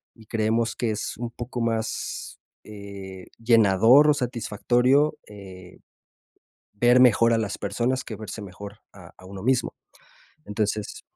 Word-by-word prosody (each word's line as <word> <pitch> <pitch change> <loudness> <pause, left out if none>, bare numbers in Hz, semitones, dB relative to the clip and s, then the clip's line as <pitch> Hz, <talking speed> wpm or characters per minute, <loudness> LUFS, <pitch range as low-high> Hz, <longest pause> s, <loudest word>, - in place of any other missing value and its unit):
y 110 - -17
creemos 115 +1 -1
que 120 - -2
es 105 -1 -4
un 120 +1 -4
poco 120 +1 -6
más, 115 -1 -3 0.2
eh, 100 -3 -10
llenador 115 +5 +5
o - - +6
satisfactorio, 125 +4 +1
eh, 95 -3 -12 1.0
ver 120 +4 +4
mejor 115 -1 +5
a - - +1
las 105 -3 -3
personas 120 +6 -1
que 110 - -8
verse 110 +1 -8
mejor 100 +1 -10 0.2
a 90 -3 -14
a 95 - -14
uno 95 0 -9
mismo. 130 +2 0 0.7
Entonces 430 0 -3
115 Hz, 135 wpm, -24 LUFS, 100-120 Hz, 1.0 s, o